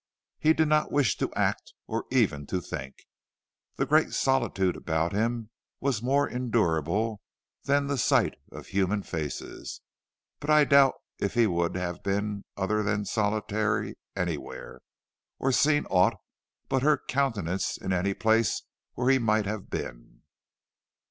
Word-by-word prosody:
He 155 +1 +4
did 160 -1 +2
not 150 0 +2
wish 140 -4 +2
to - - -1
act - - -1
or - - -3
even 75 -1 +1
to 95 - -1
think. 65 -6 -6 0.8
The - - 0
great 155 +1 +3
solitude 120 -9 +1
about 80 +2 -1
him 115 +1 -1 0.3
was 130 -6 0
more 140 +4 +2
endurable 105 - 0 0.4
than 140 0 +2
the 140 -1 -1
sight - - +3 0.2
of - - -9
human 100 +1 0
faces, 80 -6 -5 0.6
but 145 - -6
I 150 0 +7
doubt 140 -2 +5 0.2
if 100 - -2
he 120 -1 +5
would 85 -4 0
have 90 -1 -3
been 100 +1 -2
other 105 +2 0
than 105 0 -1
solitary 105 0 0 0.2
anywhere, 85 -5 -4 0.6
or 135 - +1
seen 145 +3 +3
aught 90 -1 +3 0.5
but 135 - +1
her 150 +2 +4
countenance 105 -10 -1
in 95 - -2
any 95 +2 0
place 110 0 +2 0.3
where 125 +1 +2
he 135 - +4
might 110 -2 +2
have 100 -1 -4
been. - - -7
105 Hz, 140 wpm, -28 LUFS, 95-135 Hz, 0.8 s, I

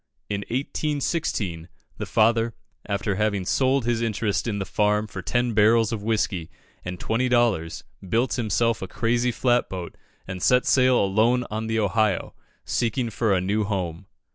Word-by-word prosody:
In 100 - -1
1816, 130 - -2 0.3
the - - -4
father, 115 +1 +2 0.3
after 100 0 -1
having 105 -3 0
sold 130 +3 +2
his 120 -1 0
interest 105 -4 -1
in 105 -3 -1
the 100 - -3
farm 105 +2 +1
for 100 -3 -7
ten 120 +5 0
barrels 110 +1 +4
of 110 -3 -3
whiskey 100 -6 -1 0.3
and 90 0 -6
twenty 125 +3 0
dollars, 115 -10 +1 0.3
built 120 +7 +1
himself 115 0 0
a 95 - -4
crazy 120 +5 0
flat 120 0 +1
boat, 90 -2 -6 0.3
and 95 -1 -6
set 125 +5 +4
sail 130 -1 +4
alone 110 +6 +2
on 110 +1 -3
the 110 0 -1
Ohio, 105 -2 +1 0.3
seeking 120 0 -1
for 110 0 0
a 90 - +1
new 105 +4 0
home. 95 -3 -3
110 Hz, 160 wpm, -24 LUFS, 100-120 Hz, 0.3 s, barrels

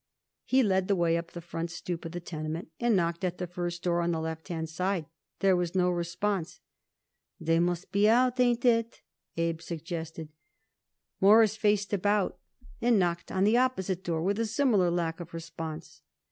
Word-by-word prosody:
He 260 0 +3
led 190 -3 +2
the 200 - +3
way 170 -2 +2
up 170 0 -3
the 175 - -8
front 170 0 -4
stoop 170 0 -5
of 165 - -5
the 175 - -4
tenement 160 -1 -5
and 235 -2 +3
knocked 170 -1 0
at 180 -1 -1
the 180 - -3
first 175 0 -4
door 175 -1 +1
on 170 - 0
the 165 - -1
left 160 -1 -5
hand 160 -2 -3
side. 180 +1 -1 0.4
There 195 -2 +5
was 175 0 -1
no 180 -1 +3
response. 175 +1 -2 0.8
"They 165 +1 +2
must 175 +1 -1
be 205 +2 +4
out. 250 +2 +3
Ain't 245 0 +2
it?" 230 -1 +2 0.3
Abe 165 -1 -1
suggested. 165 -1 -6 0.9
Morris 215 +2 +6
faced 210 -2 +1
about 205 0 +1 0.4
and 235 -1 +4
knocked 175 -2 0
on 190 0 +1
the 215 +4 +4
opposite 190 -8 0
door, 165 -2 -1
with 200 +4 0
a 230 - +1
similar 215 -6 +2
lack 170 -1 -1
of 170 -1 -8
response. 160 -1 -7
175 Hz, 180 wpm, -29 LUFS, 165-205 Hz, 0.9 s, Morris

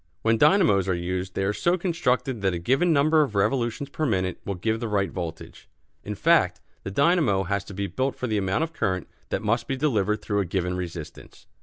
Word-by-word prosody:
When 115 0 +2
dynamos 150 - +4
are 90 - +2
used 90 +1 -3
they 95 - 0
are 100 +2 +1
so 175 - +1
constructed 135 - -1
that 95 -2 +1
a - - -1
given 135 - +2
number 155 +1 +4
of 135 -8 -1
revolutions 115 +6 0
per 150 +3 -5
minute 95 - 0
will 100 - -3
give 110 +5 -1
the 115 - -3
right 100 -4 0
voltage. 85 -3 -7 0.3
In - - -5
fact, - - +3 0.2
the - - -5
dynamo 140 - +2
has 100 +1 -1
to - - -9
be 100 +1 -2
built 130 +6 -2
for - - -4
the 110 -4 0
amount 95 +10 0
of 165 0 -4
current 95 - -1 0.2
that - - -2
must 115 +3 0
be 135 -2 -2
delivered 105 -7 0
through 100 -2 0
a 100 - 0
given 90 0 -2
resistance. 85 -3 -8
105 Hz, 215 wpm, -25 LUFS, 95-135 Hz, 0.3 s, dynamos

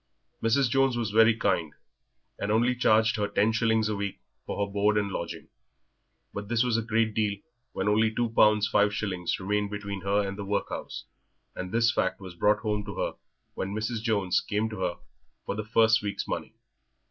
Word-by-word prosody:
Mrs. 115 +4 +3
Jones 135 0 +2
was 115 -3 -2
very 110 +1 +5
kind, 85 -8 0 0.6
and 100 - -1
only 120 +3 +3
charged 110 -2 +3
her 105 -1 0
ten 105 +2 +2
shillings 110 -1 +2
a 105 - -1
week 100 -1 -4 0.3
for 100 - -1
her 100 - -11
board 105 +1 +2
and 100 -1 0
lodging, - - -5 0.8
but 100 0 -5
this 115 +1 +2
was 125 -2 +1
a 115 - +2
great 110 0 0
deal 105 -2 0 0.4
when 95 - -2
only 110 +2 +3
two 120 +2 0
pounds 105 -1 +4
five 105 0 +2
shillings 95 -5 -2
remained 105 +2 -1
between 100 -1 -5
her 100 +1 +1
and 100 +1 -6
the - - -3
workhouse, 100 0 -4 0.5
and 90 0 -5
this 115 +1 +3
fact 95 -4 -1
was 95 -2 -9
brought 105 +4 +2
home 105 -2 -1
to - - -7
her - - -2 0.4
when 95 +2 -4
Mrs. 110 +1 -2
Jones 100 -5 +1
came 110 +1 -2
to 110 - -6
her 90 -2 -1 0.5
for - - -2
the 105 +1 -4
first 110 0 +4
week's 100 -1 -4
money. - - -4
105 Hz, 195 wpm, -27 LUFS, 100-110 Hz, 0.8 s, very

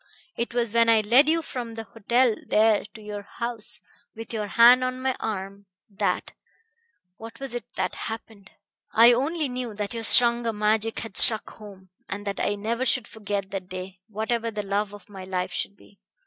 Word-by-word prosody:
It 235 +1 -3
was 235 -3 0
when 230 0 +4
I 225 -1 +5
led 250 +8 +5
you 330 +1 +2
from 240 -5 -6
the 225 - -5
hotel 235 +2 +1
there 215 -1 +3
to 220 - -10
your 210 -1 -6
house, 235 +2 -3 0.4
with 225 +1 -8
your 215 -2 -2
hand 240 +4 +7
on 255 0 -2
my 260 0 0
arm, 200 -2 -5 0.2
that 195 - -1 0.9
what 225 0 -10
was 270 -3 -4
it 240 - -4
that - - -1 0.2
happened? 220 -3 -9 0.5
I 235 +2 +8
only 300 +5 0
knew 250 -3 -5
that 205 0 -3
your 230 - -4
stronger 235 0 +4
magic 215 +1 +1
had 225 -4 -6
struck 220 -2 +3
home, 195 -3 -13 0.2
and 205 +1 -5
that 200 -1 -3
I 205 - 0
never 225 +4 -2
should 250 -2 +1
forget 205 -2 -4
that 190 -2 -5
day, 185 0 -7
whatever 225 +2 -2
the 210 -2 -4
love 200 +1 -1
of 205 - -15
my 195 -3 -10
life 185 -1 -3
should 200 - -1
be. 200 - -21
220 Hz, 190 wpm, -25 LUFS, 205-235 Hz, 0.9 s, I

